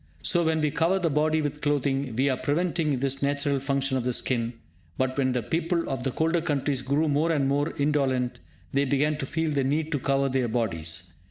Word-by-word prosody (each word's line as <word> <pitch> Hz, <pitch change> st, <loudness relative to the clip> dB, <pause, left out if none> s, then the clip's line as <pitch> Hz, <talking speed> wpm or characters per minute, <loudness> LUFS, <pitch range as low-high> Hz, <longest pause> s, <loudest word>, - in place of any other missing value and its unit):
So 175 Hz, -, +3 dB
when 160 Hz, -1 st, +1 dB
we 150 Hz, -1 st, +1 dB
cover 165 Hz, +6 st, +2 dB
the 170 Hz, -4 st, 0 dB
body 155 Hz, +2 st, +2 dB
with 150 Hz, 0 st, -3 dB
clothing, 140 Hz, -3 st, 0 dB
we 130 Hz, +4 st, +2 dB
are 135 Hz, -, +2 dB
preventing 160 Hz, 0 st, 0 dB
this 135 Hz, +1 st, -1 dB
natural 140 Hz, 0 st, +1 dB
function 135 Hz, 0 st, 0 dB
of 125 Hz, -, -2 dB
the 125 Hz, 0 st, 0 dB
skin. 120 Hz, -1 st, 0 dB, 0.4 s
But 130 Hz, 0 st, 0 dB
when 130 Hz, -2 st, +1 dB
the 125 Hz, -2 st, -1 dB
people 165 Hz, -, -1 dB
of 135 Hz, -2 st, -3 dB
the 135 Hz, -, 0 dB
colder 165 Hz, +5 st, +1 dB
countries 145 Hz, -4 st, 0 dB
grew 140 Hz, +4 st, +1 dB
more 150 Hz, +3 st, +2 dB
and 140 Hz, -4 st, +1 dB
more 145 Hz, +3 st, 0 dB
indolent, 135 Hz, -4 st, 0 dB, 0.3 s
they 140 Hz, +1 st, +2 dB
began 145 Hz, +3 st, +1 dB
to 135 Hz, -, -3 dB
feel 160 Hz, +1 st, -1 dB
the 140 Hz, -2 st, +1 dB
need 150 Hz, +4 st, 0 dB
to 145 Hz, -, 0 dB
cover 135 Hz, +1 st, +1 dB
their 130 Hz, -2 st, 0 dB
bodies. 90 Hz, -9 st, -2 dB
140 Hz, 210 wpm, -26 LUFS, 130-155 Hz, 0.4 s, So